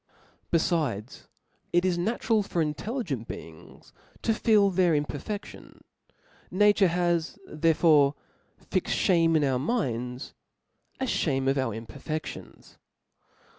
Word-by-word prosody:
Befldcs, 155 - -1 0.4
it 175 +1 +2
is 185 -2 +2
natural 220 +4 +1
for 195 -3 -3
intelligent 155 - -2
beings 80 -1 -11 0.3
to 225 - +2
feel 210 -2 +3
their 180 -2 +3
ithperfediDns. 150 +8 -5 0.7
Nature 205 0 +4
has 175 -1 0
therefore 155 -2 +3 0.6
fixed - - 0
Ihame 165 -3 +3
in 150 - +1
our 130 -3 +1
minds, 125 - -2 0.7
a 265 - 0
(hame 135 - 0
of 135 +1 +2
our 125 -5 -1
imperfedlions. 140 +7 -7
165 Hz, 105 wpm, -27 LUFS, 135-190 Hz, 0.7 s, Nature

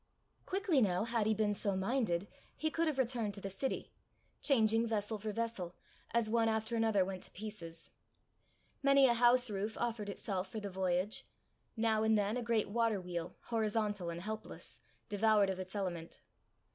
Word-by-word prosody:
Quickly 375 -7 +2
now, 185 -3 +2
had 230 -2 0
he 220 - +3
been 210 -1 +2
so 200 -1 -1
minded, 195 -3 0 0.3
he 315 0 0
could 330 +1 +1
have 305 -3 0
returned 235 -5 0
to - - -7
the 195 0 -5
city 265 +8 -3 0.5
changing 225 -4 +3
vessel 215 -1 -1
for 215 +1 -3
vessel, 205 -6 -3 0.3
as 235 -1 +1
one 225 0 +3
after 220 +1 -1
another 220 -4 +3
went 190 -1 -5
to - - -8
pieces. 175 -6 -7 0.9
Many 275 0 +6
a 245 - +5
house 245 +1 +5
roof 205 +2 -2
offered 225 -3 -1
itself 195 -1 -3
for 220 - -4
the 200 -2 -5
voyage; 185 +2 0 0.5
now 220 -1 +2
and 220 0 +4
then 205 +2 +1
a 250 - -1
great 230 -2 +1
water 230 -2 +2
wheel, 175 -2 -5
horizontal 215 -5 0
and 170 0 -4
helpless, 220 +1 -6 0.3
devoured 205 -1 +3
of 190 - -4
its 185 +2 -5
element. 175 -4 -4
215 Hz, 170 wpm, -35 LUFS, 195-230 Hz, 0.9 s, Many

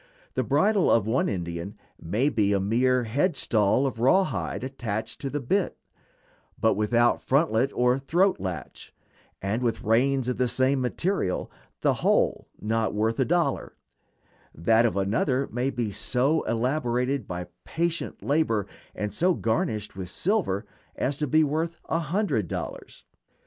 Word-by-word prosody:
The - - 0
bridle 210 -4 +3
of 115 -3 +4
one 115 +5 +1
Indian 85 0 -4 0.3
may 105 - 0
be 105 -6 +1
a 100 - +2
mere 125 +5 +2
head 140 - 0
stall 110 +1 +2
of 130 -4 -3
rawhide 180 +3 +1
attached 115 -4 -4
to 140 - -2
the 145 - -2
bit, 180 +9 0 0.8
but 110 - +3
without 115 +4 +2
frontlet 135 -3 +2
or 125 +1 +3
throat 175 +8 +2
latch, 90 -5 -6 0.5
and 105 +5 -1
with 120 0 -1
reins 125 +3 +2
of 125 - -1
the 125 - +2
same 130 +2 +1
material, 130 - -1 0.3
the - - +3
whole - - +2
not 110 0 -1
worth 110 +3 0
a 130 - +3
dollar; 170 -3 0 0.8
that 115 +8 +3
of 110 - -3
another 125 +7 +1
may 125 +4 0
be 120 -5 -2
so 130 +9 +1
elaborated 125 0 0
by 90 0 -4 0.2
patient 170 0 -2
labor, 130 - +1 0.3
and 105 -1 -3
so 180 - +2
garnished 110 -2 -1
with 95 -2 -5
silver, 165 - 0 0.3
as 135 +3 -1
to 150 - -1
be 155 +4 +4
worth 160 +3 -1
a 165 - +1
hundred 165 - 0
dollars. - - -7
125 Hz, 150 wpm, -26 LUFS, 110-145 Hz, 0.8 s, of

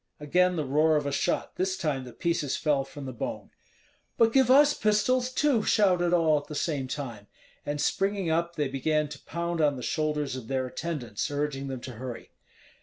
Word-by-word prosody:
Again 180 +5 +2
the 155 -3 -1
roar 155 +4 +3
of 150 -1 0
a 140 - -1
shot; - - -1
this 190 0 0
time 140 -5 -2
the 125 - -9
pieces 165 -4 -1
fell 145 -3 +1
from 140 +1 -9
the 130 - -5
bone. 115 - -5 0.7
"But 225 0 +4
give 265 -3 +4
us 290 +2 +7
pistols 245 +4 +1
too!" 265 -3 +2
shouted 180 -5 +3
all 160 -4 +4
at 145 - -14
the 150 - -7
same 145 -4 -1
time. 120 -7 -6 0.4
And 145 0 -2
springing 195 +4 0
up, 170 +1 0
they 150 -2 0
began 150 +3 0
to 145 -1 -10
pound 170 0 -2
on 145 -2 +3
the 125 - -7
shoulders 150 -2 -1
of 125 -4 -7
their 130 0 -1
attendants, 130 -6 -4
urging 145 -1 -2
them 130 -2 -5
to 130 - -7
hurry. 120 +1 -8
150 Hz, 195 wpm, -28 LUFS, 135-180 Hz, 0.7 s, us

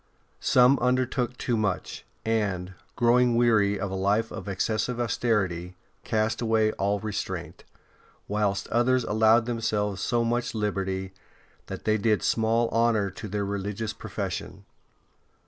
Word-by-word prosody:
Some 125 +2 +5
undertook 125 0 0
too 120 - -1
much, 105 -4 -2 0.2
and, 100 -5 -1 0.2
growing 120 0 +3
weary 110 -4 +3
of 95 0 -3
a - - -4
life 100 +4 +1
of - - -7
excessive 110 +5 -1
austerity, 100 -7 -1 0.3
cast 110 +1 0
away 110 -2 +2
all 100 0 -1
restraint; 105 -1 -5 0.6
whilst 100 -1 0
others 125 +2 +2
allowed 110 +2 +4
themselves 105 -4 -1
so 120 -1 +1
much 120 0 -1
liberty 95 -3 -2 0.5
that - - -7
they 110 0 +2
did 105 0 +1
small 115 +1 +2
honour 115 -4 +2
to 105 +3 -8
their 100 0 -2
religious 100 +2 -3
profession. - - -5
110 Hz, 130 wpm, -26 LUFS, 100-120 Hz, 0.6 s, Some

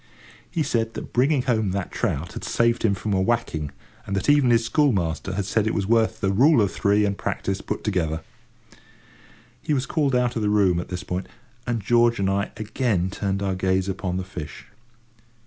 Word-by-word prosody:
He 165 - -1
said 115 -4 -1
that - - -7
bringing 135 +2 +3
home 110 -7 0
that 100 -2 -3
trout - - -2
had - - -7
saved 115 +1 +1
him 100 -3 +2
from 105 +1 -3
a 95 - +2
whacking, 95 -9 -1 0.4
and 100 - -2
that 95 +9 +2
even 145 -4 +4
his 115 -1 +3
school 145 +3 +3
master 90 -1 -2
had 100 -1 -1
said 110 +2 +1
it - - 0
was 100 - 0
worth 115 +1 +2
the 95 -2 +1
rule 130 +8 +5
of 100 -2 +2
three 105 0 +2
and 100 -1 0
practice 95 -1 -3
put - - -4
together. 80 -6 -1 1.4
He 150 - 0
was 130 0 0
called 140 -4 0
out 125 -1 +1
of 115 - -1
the 105 - +1
room 100 -4 +3
at 90 - -5
this 90 +1 -4
point, 90 0 -4 0.4
and 115 -4 -1
George 120 +2 +3
and 95 -1 +1
I 100 +1 0
again 110 -4 -1
turned 100 0 -2
our 95 -1 0
gaze 95 0 0
upon 95 -1 -2
the 95 - -2
fish. 80 -5 -8
105 Hz, 205 wpm, -24 LUFS, 95-120 Hz, 1.4 s, rule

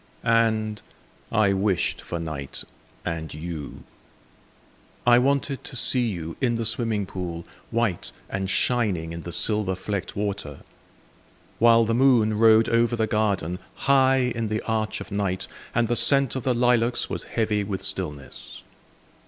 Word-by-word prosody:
And 110 -2 +1 0.5
I 100 -2 +3
wished 95 -2 0
for 85 - -5
night 75 -4 -5 0.4
and 80 -2 -3
you. 80 -2 -7 1.2
I 120 0 +7
wanted 140 +1 0
to 135 - -7
see 125 0 +2
you 85 -6 -5
in 120 -2 +2
the 115 0 -2
swimming 110 -2 0
pool, 85 -3 -6 0.2
White 115 -6 -1 0.2
and 95 -1 -3
shining 95 -9 0
in 85 - -6
the 85 - -7
silver 105 +1 +1
flecked 100 +1 -4
water. 100 -8 -4 1.0
While 115 0 +6
the 115 - 0
moon 115 -4 +3
rode 110 0 +6
over 115 +1 +2
the 110 -1 +1
garden, 100 -5 0 0.3
High 130 -2 +4
in 115 -1 -2
the 110 +1 -2
arch 110 -1 -2
of - - -9
night, 100 -2 -1 0.3
And 120 0 +2
the 120 - 0
scent 135 0 +3
of 130 - -2
the 125 0 0
lilacs 120 0 +2
was - - -4
heavy 110 -2 0
with 95 -1 -4
stillness. 75 -7 -4
110 Hz, 145 wpm, -25 LUFS, 95-120 Hz, 1.2 s, I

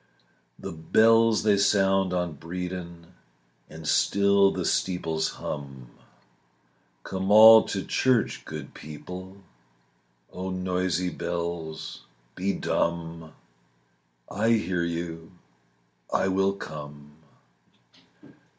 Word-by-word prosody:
The - - -7
bells 110 +7 +3
they 105 -2 +3
sound 95 -2 +2
on 90 -2 -1
Bredon, 85 +1 -7 0.6
And 80 -1 -9
still 100 0 +3
the - - -3
steeples 80 -4 -1
hum. 70 -4 -7 1.1
"Come 95 0 -4
all 110 +1 +10
to 95 - -3
church, 130 -3 +1
good - - -8
people," 90 +5 -9 1.0
Oh, 95 +1 -5
noisy 90 -1 -1
bells, 85 -2 -5 0.3
be 95 +8 -1
dumb; 85 -3 -3 0.9
I 110 +4 +1
hear 95 -5 0
you, 85 0 -5 0.8
I 95 - +1
will 95 +1 +1
come. 75 -5 -9
90 Hz, 90 wpm, -26 LUFS, 80-95 Hz, 1.1 s, all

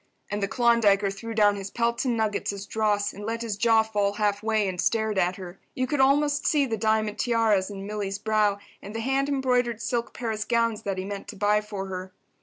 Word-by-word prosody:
And 205 0 -2
the 200 - +1
Klondiker 215 -4 +3
threw 225 +3 -7
down 205 -2 +4
his 195 0 -6
pelts 235 +3 -1
and 240 -3 +1
nuggets 215 -2 -1
as 200 0 -7
dross, 205 -1 0
and 205 - -9
let 230 +2 -3
his 225 -3 -2
jaw 225 +1 +4
fall 205 -2 0
half 205 -1 0
way, 220 -2 +1
and 180 -2 -2
stared 220 -3 +1
at 180 0 +1
her. 185 -1 -9 0.2
You 255 - 0
could 285 +2 -2
almost 290 +2 +3
see 290 -3 +3
the 230 -4 -2
diamond 220 0 0
tiaras 225 -5 +2
on 195 -1 -7
Milly's 200 -1 -3
brow 210 -1 +1 0.2
and 205 +2 -9
the 225 - -2
hand 270 +3 0
embroidered 250 -4 +1
silk 235 +1 -2
Paris 220 -3 -3
gowns 230 -1 0
that 195 -2 -3
he 185 - -3
meant 200 0 -6
to - - -8
buy 210 +1 +2
for 205 -2 -6
her. 185 0 -6
215 Hz, 220 wpm, -26 LUFS, 200-235 Hz, 0.2 s, down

